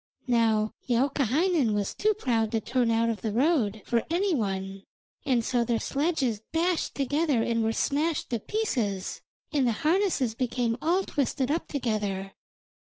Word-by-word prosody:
Now 225 Hz, -3 st, +2 dB, 0.2 s
Youkahainen 275 Hz, -, +2 dB
was 205 Hz, -1 st, -1 dB
too 430 Hz, 0 st, +1 dB
proud 230 Hz, -, 0 dB
to 225 Hz, -, +2 dB
turn 245 Hz, +1 st, 0 dB
out 230 Hz, 0 st, +2 dB
of 215 Hz, -4 st, -5 dB
the 220 Hz, -, -2 dB
road 230 Hz, -, +1 dB
for 235 Hz, -1 st, +1 dB
any 365 Hz, +3 st, +1 dB
one, 195 Hz, -5 st, -2 dB, 0.5 s
and 240 Hz, -4 st, +2 dB
so 245 Hz, -2 st, +1 dB
their 235 Hz, 0 st, 0 dB
sledges 275 Hz, -7 st, 0 dB
dashed 335 Hz, +1 st, 0 dB
together 285 Hz, -2 st, +1 dB
and 230 Hz, -1 st, 0 dB
were 220 Hz, -, +1 dB
smashed 295 Hz, +6 st, 0 dB
to 235 Hz, -, 0 dB
pieces, 220 Hz, -, -2 dB, 0.3 s
and 275 Hz, -4 st, +2 dB
the 235 Hz, -, +2 dB
harnesses 330 Hz, -, +2 dB
became 240 Hz, -1 st, -1 dB
all 355 Hz, +4 st, +2 dB
twisted 270 Hz, -3 st, -1 dB
up 325 Hz, -, -1 dB
together. 210 Hz, -7 st, -2 dB
245 Hz, 155 wpm, -27 LUFS, 225-305 Hz, 0.5 s, Now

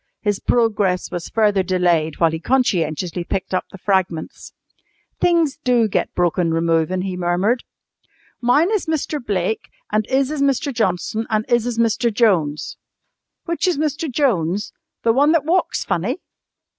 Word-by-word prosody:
His 205 Hz, -2 st, 0 dB
progress 210 Hz, -6 st, +1 dB
was 175 Hz, -1 st, -5 dB
further 210 Hz, -3 st, +2 dB
delayed 175 Hz, -4 st, +1 dB
while 165 Hz, -1 st, +4 dB
he 160 Hz, -, -3 dB
conscientiously 175 Hz, -, 0 dB
picked 190 Hz, +2 st, -4 dB
up 185 Hz, -, 0 dB
the -, -, -10 dB
fragments. 185 Hz, -4 st, -2 dB, 0.7 s
"Things 335 Hz, -5 st, +2 dB
do 245 Hz, -3 st, +3 dB
get 205 Hz, -, -1 dB
broken 175 Hz, -1 st, +1 dB
removin'," 165 Hz, +2 st, +1 dB
he 190 Hz, -1 st, -3 dB
murmured. 180 Hz, +7 st, 0 dB, 0.8 s
"Mine 290 Hz, -, +3 dB
is 425 Hz, -6 st, 0 dB
Mister 310 Hz, -1 st, -1 dB
Blake 205 Hz, -3 st, -2 dB, 0.2 s
and 215 Hz, 0 st, 0 dB
'is 270 Hz, +1 st, +1 dB
is 305 Hz, -2 st, -2 dB
Mister 280 Hz, 0 st, +1 dB
Johnson, 220 Hz, -1 st, -1 dB
and 215 Hz, 0 st, 0 dB
'is 240 Hz, -1 st, +2 dB
is 240 Hz, -2 st, -3 dB
Mister 230 Hz, +1 st, +2 dB
Jones." 185 Hz, -10 st, +1 dB, 0.7 s
"Which 340 Hz, +2 st, -1 dB
is 360 Hz, -, +1 dB
Mr. 300 Hz, 0 st, -2 dB
Jones? 205 Hz, -, 0 dB, 0.3 s
The 230 Hz, -, +3 dB
one 290 Hz, +5 st, +4 dB
that 315 Hz, -4 st, +2 dB
walks 355 Hz, +4 st, +1 dB
funny?" -, -, -1 dB
215 Hz, 150 wpm, -20 LUFS, 180-260 Hz, 0.8 s, while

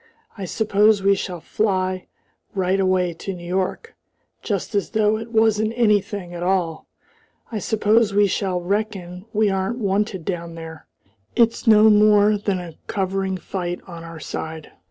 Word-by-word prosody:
I 195 Hz, -, -5 dB
suppose 210 Hz, +1 st, +2 dB
we 200 Hz, 0 st, +5 dB
shall 180 Hz, -3 st, -4 dB
fly 185 Hz, -3 st, -1 dB, 0.5 s
right 190 Hz, 0 st, +1 dB
away 185 Hz, -2 st, +2 dB
to 190 Hz, +3 st, -6 dB
New 175 Hz, -1 st, -10 dB
York 190 Hz, -, -2 dB, 0.5 s
just 200 Hz, -5 st, -3 dB
as 200 Hz, -1 st, 0 dB
though 215 Hz, -1 st, +2 dB
it 230 Hz, +1 st, -8 dB
wasn't 220 Hz, -1 st, +2 dB
anything 205 Hz, -5 st, +1 dB
at 175 Hz, -, -6 dB
all. 175 Hz, -3 st, -1 dB, 0.6 s
I 220 Hz, -, -2 dB
suppose 220 Hz, +2 st, +2 dB
we 205 Hz, +1 st, +4 dB
shall 190 Hz, -2 st, -1 dB
reckon 190 Hz, -1 st, -3 dB
we 210 Hz, -1 st, +2 dB
aren't 195 Hz, +5 st, -1 dB
wanted 200 Hz, -4 st, -1 dB
down 170 Hz, -3 st, -4 dB
there. 160 Hz, -1 st, -9 dB, 0.5 s
It's 235 Hz, +1 st, +2 dB
no 215 Hz, 0 st, +7 dB
more 210 Hz, 0 st, +5 dB
than 200 Hz, -2 st, -1 dB
a 170 Hz, -3 st, -9 dB
covering 190 Hz, -1 st, -1 dB
fight 180 Hz, -1 st, -4 dB
on 170 Hz, -3 st, -9 dB
our 165 Hz, -1 st, -9 dB
side. 160 Hz, 0 st, -6 dB
195 Hz, 155 wpm, -22 LUFS, 180-210 Hz, 0.6 s, no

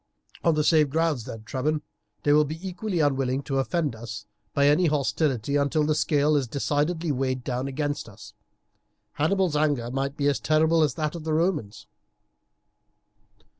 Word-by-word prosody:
"On 165 Hz, -2 st, +3 dB
the 150 Hz, -, +1 dB
same 155 Hz, -1 st, +4 dB
grounds 155 Hz, -5 st, 0 dB
then, 110 Hz, -1 st, -8 dB
Trebon, 150 Hz, +6 st, -2 dB, 0.4 s
they 145 Hz, -, +4 dB
will 150 Hz, +1 st, +6 dB
be 155 Hz, +2 st, -5 dB
equally 180 Hz, -1 st, -2 dB
unwilling 135 Hz, -2 st, +1 dB
to 135 Hz, -1 st, -1 dB
offend 150 Hz, -2 st, -1 dB
us 110 Hz, -1 st, -8 dB, 0.3 s
by 140 Hz, -, +2 dB
any 150 Hz, +5 st, +4 dB
hostility 140 Hz, -3 st, 0 dB
until 145 Hz, +2 st, +1 dB
the 155 Hz, +1 st, +2 dB
scale 150 Hz, 0 st, +2 dB
is 140 Hz, -3 st, +1 dB
decidedly 150 Hz, +5 st, -1 dB
weighed 130 Hz, -1 st, -1 dB
down 130 Hz, +1 st, -2 dB
against 145 Hz, -2 st, -3 dB
us. 105 Hz, 0 st, -13 dB, 0.9 s
Hannibal's 180 Hz, +1 st, +2 dB
anger 145 Hz, -6 st, +1 dB
might 135 Hz, +2 st, -2 dB
be 145 Hz, -, -1 dB
as 145 Hz, -, +1 dB
terrible 160 Hz, +1 st, +3 dB
as 150 Hz, -, +2 dB
that 155 Hz, -2 st, -2 dB
of 170 Hz, -2 st, -7 dB
the 160 Hz, 0 st, -1 dB
Romans." 155 Hz, -, -1 dB
145 Hz, 165 wpm, -26 LUFS, 135-155 Hz, 0.9 s, will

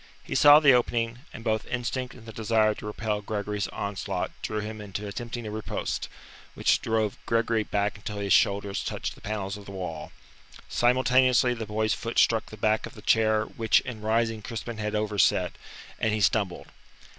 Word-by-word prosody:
He -, -, -6 dB
saw 145 Hz, 0 st, +8 dB
the 140 Hz, -4 st, +6 dB
opening, 120 Hz, -1 st, +1 dB
and 115 Hz, -, -9 dB
both 110 Hz, -2 st, -1 dB
instinct 125 Hz, +1 st, -3 dB
and 115 Hz, -, -14 dB
the 110 Hz, -, -9 dB
desire 110 Hz, -1 st, +2 dB
to 105 Hz, -, -8 dB
repel 105 Hz, 0 st, -2 dB
Gregory's 105 Hz, 0 st, -3 dB
onslaught 100 Hz, -2 st, -3 dB
drew 110 Hz, -, -2 dB
him 105 Hz, 0 st, -6 dB
into 105 Hz, 0 st, -6 dB
attempting 120 Hz, +3 st, -5 dB
a 105 Hz, -, -5 dB
riposte, 110 Hz, 0 st, -3 dB, 0.5 s
which -, -, +2 dB
drove 110 Hz, -2 st, -1 dB
Gregory 115 Hz, -1 st, +2 dB
back 105 Hz, +1 st, -1 dB
until 105 Hz, 0 st, -6 dB
his 100 Hz, -1 st, +1 dB
shoulders 100 Hz, 0 st, +2 dB
touched -, -, -3 dB
the -, -, -18 dB
panels 100 Hz, -1 st, -3 dB
of 100 Hz, -, -12 dB
the 100 Hz, -, -9 dB
wall. 90 Hz, -5 st, -6 dB, 0.6 s
Simultaneously 125 Hz, 0 st, +3 dB
the 115 Hz, -2 st, -5 dB
boy's 110 Hz, +1 st, 0 dB
foot 115 Hz, 0 st, -5 dB
struck 115 Hz, -1 st, +3 dB
the 110 Hz, -, -10 dB
back 110 Hz, +1 st, +1 dB
of -, -, -14 dB
the 105 Hz, -, -12 dB
chair 110 Hz, -1 st, +3 dB
which 115 Hz, -1 st, +2 dB
in 125 Hz, -5 st, -7 dB
rising 110 Hz, 0 st, 0 dB
Crispin 115 Hz, +2 st, -6 dB
had 105 Hz, 0 st, -2 dB
overset, 105 Hz, -2 st, +2 dB, 0.5 s
and 110 Hz, -, +1 dB
he -, -, -1 dB
stumbled. 100 Hz, -3 st, +1 dB
110 Hz, 180 wpm, -27 LUFS, 105-115 Hz, 0.6 s, saw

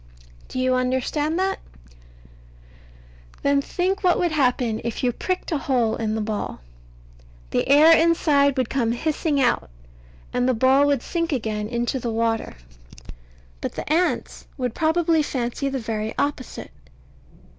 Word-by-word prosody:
Do -, -, -7 dB
you 255 Hz, 0 st, +2 dB
understand 260 Hz, +5 st, 0 dB
that? 380 Hz, +1 st, 0 dB, 1.8 s
Then 280 Hz, 0 st, +3 dB
think 370 Hz, +7 st, -2 dB
what 360 Hz, -1 st, +4 dB
would 350 Hz, -2 st, +1 dB
happen 250 Hz, -6 st, +1 dB
if 235 Hz, +1 st, -4 dB
you 250 Hz, -, +3 dB
pricked 365 Hz, +10 st, -3 dB
a 310 Hz, -, 0 dB
hole 245 Hz, -5 st, +1 dB
in 220 Hz, -1 st, -2 dB
the 220 Hz, -, -1 dB
ball. 210 Hz, -, -4 dB, 0.9 s
The -, -, 0 dB
air 310 Hz, +4 st, +8 dB
inside 295 Hz, -4 st, +3 dB
would 255 Hz, -3 st, +1 dB
come 235 Hz, -3 st, 0 dB
hissing 305 Hz, +2 st, -1 dB
out, 260 Hz, -, +1 dB, 0.6 s
and 250 Hz, +1 st, +1 dB
the 255 Hz, -, +2 dB
ball 265 Hz, +4 st, +4 dB
would 280 Hz, -4 st, +1 dB
sink 335 Hz, -1 st, -2 dB
again 215 Hz, -5 st, -2 dB
into 240 Hz, +3 st, -2 dB
the 240 Hz, -, -3 dB
water. 225 Hz, 0 st, -1 dB, 1.1 s
But -, -, -4 dB
the -, -, -6 dB
ants 350 Hz, +2 st, -1 dB
would 250 Hz, -4 st, -2 dB
probably 320 Hz, 0 st, +2 dB
fancy 265 Hz, -1 st, -2 dB
the 270 Hz, -, -2 dB
very 220 Hz, -2 st, -3 dB
opposite. 285 Hz, -3 st, -3 dB
265 Hz, 145 wpm, -23 LUFS, 235-315 Hz, 1.8 s, air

